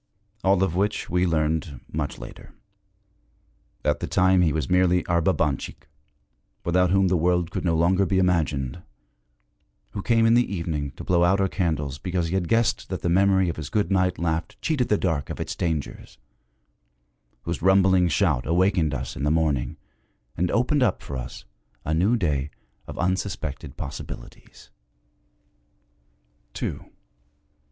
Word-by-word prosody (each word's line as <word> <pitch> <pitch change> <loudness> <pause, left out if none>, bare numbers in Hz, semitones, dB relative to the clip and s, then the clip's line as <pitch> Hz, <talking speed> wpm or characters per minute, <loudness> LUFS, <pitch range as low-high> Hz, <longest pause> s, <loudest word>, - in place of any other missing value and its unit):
All 95 0 +3
of 85 -3 -1
which 100 0 -1
we 90 +1 +2
learned 80 -3 -1
much 75 -3 -3
later. - - -11 1.3
At 75 -1 +1
the - - -3
time, 95 0 +3
he 85 -3 +3
was 75 0 -1
merely 90 -1 +3
our 85 -1 +1
Babanchik, 80 -5 -1 0.8
without 90 +1 +3
whom 95 +1 +3
the 90 - +2
world 90 0 +1
could - - -3
no 85 -2 +1
longer 90 +4 +3
be 95 - +1
imagined; 80 -6 0 1.1
who 100 - -5
came 115 +2 +3
in 115 - +5
the 120 -2 +3
evening 80 -6 -2
to - - -9
blow 85 -1 +2
out 95 +3 +3
our 95 - +2
candles 75 -7 -2
because 90 -1 -2
he - - -4
had 95 -3 0
guessed 115 +1 +1
that - - -4
the 85 - +1
memory 95 +1 +3
of 85 - -3
his 75 -3 -5
good 105 -2 0
night 95 -1 +2
laugh 80 -1 -1
cheated 145 -7 0
the 105 - +3
dark 80 -8 -1
of - - -6
its - - -4
dangers; 80 -4 -4 1.3
whose - - -4
rumbling 95 0 +4
shout 75 -6 +1
awakened 85 -3 +2
us - - -5
in - - -6
the 75 - +2
morning 75 -6 0 0.6
and 90 +1 0
opened 130 +4 +1
up 115 -7 +1
for 70 - -6
us 60 - -7 0.4
a 80 - 0
new 95 +9 +3
day 75 - -1 0.4
of - - -8
unsuspected 95 -4 -3
possibilities. - - -9
90 Hz, 155 wpm, -24 LUFS, 80-95 Hz, 1.3 s, in